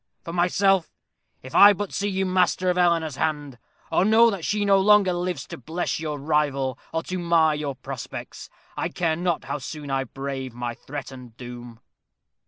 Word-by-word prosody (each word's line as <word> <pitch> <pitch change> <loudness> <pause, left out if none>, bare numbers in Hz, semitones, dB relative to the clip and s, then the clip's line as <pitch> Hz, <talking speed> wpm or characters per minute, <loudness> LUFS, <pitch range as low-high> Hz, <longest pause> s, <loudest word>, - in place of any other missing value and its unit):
For 165 - -6
myself, 180 +1 +2 0.5
if 130 - -10
I 205 +1 +9
but 205 0 -5
see 200 - -1
you 190 0 -1
master 185 0 +2
of 180 - -3
Eleanor's 165 -5 +2
hand, 145 -5 -2 0.3
or - - +3
know 225 +3 +5
that 195 -5 -5
she 205 +3 0
no 195 -1 +5
longer 200 -1 +5
lives 175 0 -3
to - - -9
bless 160 +9 -3
your 155 -2 -3
rival, 140 -3 0
or 165 0 -2
to 185 0 -4
mar 165 -2 +3
your 150 -2 -3
prospects, 130 -1 -8 0.3
I - - -2
care 165 -3 0
not 175 -1 -1
how - - -4
soon 145 +1 -7
I 135 0 0
brave 135 -1 -6
my 120 -1 -3
threatened 130 -3 -9
doom." 120 -2 -10
160 Hz, 180 wpm, -24 LUFS, 135-185 Hz, 0.5 s, I